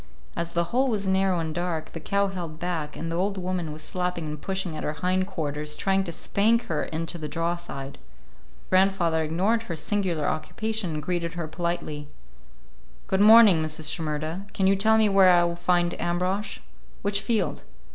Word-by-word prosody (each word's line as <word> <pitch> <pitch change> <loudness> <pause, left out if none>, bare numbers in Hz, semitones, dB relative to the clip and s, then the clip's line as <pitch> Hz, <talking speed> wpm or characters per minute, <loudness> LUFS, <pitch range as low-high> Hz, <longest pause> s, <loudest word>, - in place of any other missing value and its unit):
As 170 0 -3
the 170 - +3
hole 260 +2 +3
was 210 -5 -1
narrow 190 -1 +2
and 160 -1 -3
dark, 170 -2 -3
the 165 - -6
cow 200 +5 +1
held 170 -5 -6
back, 160 -3 -3
and 165 0 -4
the - - -2
old 195 +3 0
woman 180 -3 -2
was 155 +1 -6
slapping 180 -3 -2
and 150 -1 -6
pushing 190 -4 -3
at 155 - -5
her 150 - -1
hind 185 +3 0
quarters, 150 -4 -3
trying 195 +2 +1
to 170 - -4
spank 225 +7 +2
her 160 -8 -2
into 165 +2 -3
the 155 - -4
draw 165 +3 -1
side. 140 -5 -7 0.7
Grandfather 185 -4 +3
ignored 190 +9 +1
her 180 -7 -5
singular 175 -2 -1
occupation 185 +4 -2
and 150 - -4
greeted 175 0 -2
her 170 -2 -3
politely. 170 -3 -3 1.0
"Good 190 - +1
morning, 215 -5 +8
Mrs. 155 -1 -2
Shimerda. 160 +4 -3
Can 195 - +1
you 195 +1 +5
tell 220 +3 +4
me 220 -1 +4
where 195 -2 +6
I 175 -1 +6
will 170 0 -1
find 175 0 +1
Ambrosch? 180 +4 -1 0.4
Which 200 0 +1
field?" 210 -2 -1
175 Hz, 185 wpm, -26 LUFS, 160-195 Hz, 1.0 s, morning